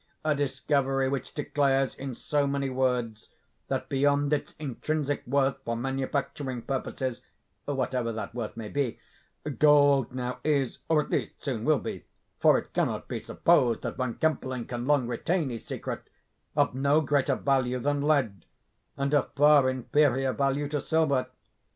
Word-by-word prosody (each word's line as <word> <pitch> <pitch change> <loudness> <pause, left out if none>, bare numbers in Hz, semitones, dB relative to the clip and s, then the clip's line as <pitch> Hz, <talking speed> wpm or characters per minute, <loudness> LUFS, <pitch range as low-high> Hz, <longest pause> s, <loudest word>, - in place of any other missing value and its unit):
a 155 - +3
discovery 135 -1 0
which 135 0 -3
declares, 135 -2 +1
in 135 -2 -6
so 145 +2 0
many 140 -1 -1
words, 125 -4 -1 0.4
that - - -2
beyond 145 +1 +2
its 150 - -2
intrinsic 145 +1 -2
worth 135 +1 +2
for 115 0 -2
manufacturing 135 0 -3
purposes 130 -2 -3 0.4
(whatever 130 -4 -1
that 110 +1 -5
worth 115 -2 -5
may 110 -2 -5
be), 135 -1 -1 0.6
gold 145 -3 +5
now 125 0 -4
is, 140 -4 0
or 155 -2 +4
at - - -12
least - - -1
soon 125 -6 -2
will 155 -1 +4
be - - -6 0.4
(for - - +6
it - - -6
cannot - - -1
be - - -3
supposed 120 -3 +2
that - - -3
Von 130 -2 -2
Kempelen 130 -6 -1
can 120 0 -4
long 145 -4 +3
retain 140 +5 -1
his 115 - -7
secret), - - -5 0.5
of - - +2
no 140 +4 +3
greater 140 -2 +1
value 130 -2 +1
than 145 +3 0
lead, 135 - +1 0.5
and 140 +1 -1
of 145 - +2
far 145 -2 +6
inferior 130 0 +2
value 140 +1 0
to 145 0 -2
silver. 145 -6 +1
135 Hz, 155 wpm, -28 LUFS, 125-145 Hz, 0.6 s, for